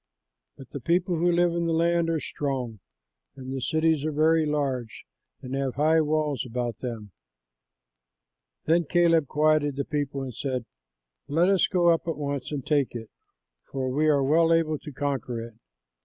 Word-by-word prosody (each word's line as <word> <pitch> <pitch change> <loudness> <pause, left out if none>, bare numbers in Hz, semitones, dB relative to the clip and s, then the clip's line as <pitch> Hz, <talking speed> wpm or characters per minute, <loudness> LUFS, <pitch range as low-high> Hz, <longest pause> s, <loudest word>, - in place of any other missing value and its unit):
But 135 - -13
the 140 - -5
people 175 +6 +1
who 175 +2 +2
live 175 0 +3
in 170 0 -1
the 165 - 0
land 170 0 +2
are 165 -1 0
strong, 130 -8 -4 0.6
and 130 -1 -7
the 135 - -3
cities 160 +1 +1
are 155 - -1
very 155 +1 +3
large 135 -6 -2 0.4
and 125 - -6
have 135 -2 -2
high 155 +3 +3
walls 150 -3 0
about 120 -1 -4
them." 115 -5 -6 1.5
Then 165 +1 +3
Caleb 165 -2 +3
quieted 150 -1 +2
the 140 0 -2
people 140 -2 -3
and 130 -2 -6
said, 130 0 -3 0.6
"Let 165 +6 +2
us 195 -2 +3
go 175 -3 +3
up 165 0 +1
at 165 -3 -2
once 140 -2 -4
and 145 -3 -4
take 145 -5 +1
it, 115 -2 -7 0.6
for 130 -1 -2
we 150 +4 +1
are 145 -3 +3
well 165 +4 +3
able 160 -2 +2
to 150 - -9
conquer 135 -4 -3
it." 115 0 -8
150 Hz, 170 wpm, -26 LUFS, 130-165 Hz, 1.5 s, live